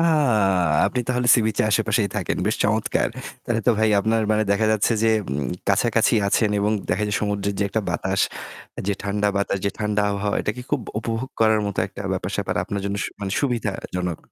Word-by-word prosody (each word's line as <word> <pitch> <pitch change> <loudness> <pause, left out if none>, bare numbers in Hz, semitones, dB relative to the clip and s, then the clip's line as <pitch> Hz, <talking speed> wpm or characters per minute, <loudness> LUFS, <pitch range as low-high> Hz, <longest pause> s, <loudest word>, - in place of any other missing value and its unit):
আ - - +3 0.8
আপনি 125 - -1
তাহলে 125 -1 0
সি-বিচের 110 -3 +1
আশেপাশেই 110 -1 +2
থাকেন। - - -1
বেশ - - +1
চমৎকার। - - +1 0.4
তাহলে 115 -1 0
তো - - +6
ভাই 110 0 +3
আপনার 110 +2 +1
মানে 110 0 +2
দেখা 100 +2 +2
যাচ্ছে 110 +2 +2
যে 115 - +4 0.2
উম 70 0 -2 0.2
কাছাকাছি 110 +4 +3
আছেন 105 +1 +2
এবং 105 +2 +1 0.2
দেখা 100 +4 0
যায় 105 - 0
সমুদ্রের 100 -1 -1
যে 100 - +1
একটা 110 - -1
বাতাস, 95 0 -1 0.7
যে 100 - +2
ঠান্ডা 105 +1 0
বাতাস, 100 0 0
যে 100 - +2
ঠান্ডা 105 -1 0
আবহওয়া 100 0 -1
এটা - - -1
কি 125 - -6
খুব 145 - +1 0.2
উপভোগ 115 +3 -3
করার 110 -1 +4
মতো 100 -2 -5
একটা 95 - -11
ব্যাপার-স্যাপার 95 +1 -2
আপনার 100 +1 -3
জন্য 100 0 -2
সু - - -2
মানে 95 -1 -3
সুবিধাজনক, 100 - -2
105 Hz, 190 wpm, -23 LUFS, 100-110 Hz, 0.8 s, তো